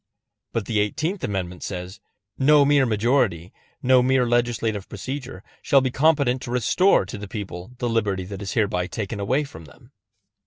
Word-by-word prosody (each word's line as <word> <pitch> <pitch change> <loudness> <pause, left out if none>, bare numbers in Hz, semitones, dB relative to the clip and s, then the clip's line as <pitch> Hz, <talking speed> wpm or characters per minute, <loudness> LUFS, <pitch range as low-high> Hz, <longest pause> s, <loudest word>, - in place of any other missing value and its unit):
But 115 -3 -2
the 110 +1 0
Eighteenth 160 - -1
Amendment 95 -6 -3
says: 90 +1 -6 0.4
No 145 +1 +5
mere 140 -2 +4
majority, 110 - +1 0.3
no 130 0 +5
mere 130 0 +2
legislative 120 -4 0
procedure, 125 -1 -6 0.2
shall 140 - +4
be 130 -1 -1
competent 140 -3 +2
to - - -7
restore 125 - +3
to 95 - -7
the 105 - -7
people 95 +1 -7
the 120 - -2
liberty 105 -5 0
that 100 +1 -7
is 100 - -4
hereby 95 -5 0
taken 100 +3 -5
away 130 +9 +1
from 80 - -11
them. 70 - -19
115 Hz, 165 wpm, -23 LUFS, 95-130 Hz, 0.4 s, No